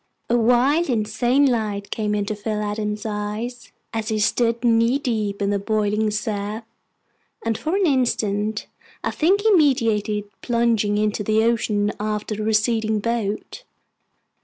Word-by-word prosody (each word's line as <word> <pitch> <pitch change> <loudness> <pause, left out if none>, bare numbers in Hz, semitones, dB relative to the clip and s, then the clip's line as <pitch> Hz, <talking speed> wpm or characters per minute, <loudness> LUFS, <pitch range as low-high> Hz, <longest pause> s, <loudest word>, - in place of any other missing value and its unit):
A - - +4
wild, 250 +8 +3
insane 240 +4 +2
light 215 -5 -1
came 210 -1 -1
into 205 +1 -2
Phil 210 0 -3
Adams's 210 0 -3
eyes, 215 +3 -4 0.2
as 225 0 -2
he 220 - 0
stood 230 +3 +1
knee 230 +2 +3
deep 215 -7 -2
in 200 - +1
the 200 - 0
boiling 215 +1 0
surf, 210 +1 -3 0.8
and 225 -1 +1
for 315 - -2
an 395 -1 +2
instant 215 - 0 0.4
I - - 0
think 380 +6 +2
he 440 +1 +3
meditated 225 - +2 0.2
plunging 230 -4 +1
into 210 0 0
the 215 +2 +2
ocean 210 -3 +1
after 210 0 -2
the 215 - -4
receding 220 0 +1
boat. 230 - -3
220 Hz, 140 wpm, -22 LUFS, 210-240 Hz, 0.8 s, A